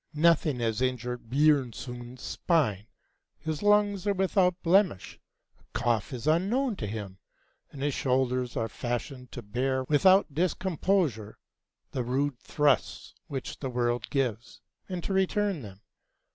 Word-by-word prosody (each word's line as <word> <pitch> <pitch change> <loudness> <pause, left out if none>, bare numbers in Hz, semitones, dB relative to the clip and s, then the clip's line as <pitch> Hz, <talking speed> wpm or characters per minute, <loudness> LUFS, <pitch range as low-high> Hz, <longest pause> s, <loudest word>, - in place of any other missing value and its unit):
Nothing 155 -4 +3
has 115 0 0
injured 125 -2 -2
Björnson's 125 -3 0
spine; 115 - 0 0.5
his 160 -1 -4
lungs 205 -1 +3
are 200 - +2
without 185 -1 +2
blemish; 180 - +2 0.4
a - - -29
cough 115 -3 0
is 125 -1 -6
unknown 205 - +2
to 105 - -4
him; 100 -2 -6 0.5
and 140 -1 -7
his 145 -1 +1
shoulders 125 -1 0
were 115 - 0
fashioned 125 +2 -5
to 120 - -7
bear 130 +5 -1
without 165 +5 +4
discomposure 170 - 0 0.5
the 130 - -2
rude 130 +2 -1
thrusts 145 -4 0
which 135 -2 -5
the 135 - -3
world 120 -1 -1
gives, 120 -5 -2 0.3
and 180 -2 -4
to 195 - -2
return 190 -2 +1
them. 100 -3 -11
135 Hz, 130 wpm, -28 LUFS, 120-175 Hz, 0.5 s, without